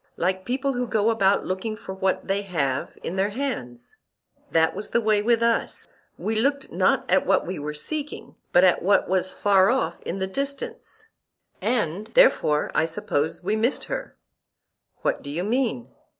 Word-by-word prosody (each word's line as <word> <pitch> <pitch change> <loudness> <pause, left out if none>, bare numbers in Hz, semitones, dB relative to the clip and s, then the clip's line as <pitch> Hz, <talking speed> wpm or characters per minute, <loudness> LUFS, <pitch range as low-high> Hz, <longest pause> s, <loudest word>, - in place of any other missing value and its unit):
Like 185 +2 -1
people 270 +2 -1
who 245 0 -2
go 220 0 +2
about 200 -3 +2
looking 200 +4 -3
for 190 - -7
what 190 0 -1
they 195 +1 0
have 145 -9 -2
in 185 - -4
their 195 +2 +2
hands—that 160 - -3
was 210 - -5
the - - +2
way 215 -2 +2
with 230 +1 +2
us—we 230 -1 -2
looked 275 +1 0
not 185 +2 +2
at 185 +1 +3
what 190 0 +2
we 180 -2 -4
were 150 +1 -4
seeking, 295 - -6 0.2
but 175 - +5
at 185 -2 +4
what 200 +3 +3
was 185 0 +1
far 195 -2 +4
off 265 +2 0
in - - -4
the 190 - -1
distance; 280 - -5 0.5
and 210 -3 -1
therefore, 155 - +4
I - - +2
suppose, 165 -2 -2
we 205 +4 0
missed 230 +5 +1
her. - - -5 0.9
What - - 0
do 140 - -8
you 165 +5 -2
mean? 225 - -1
200 Hz, 165 wpm, -24 LUFS, 180-235 Hz, 0.9 s, but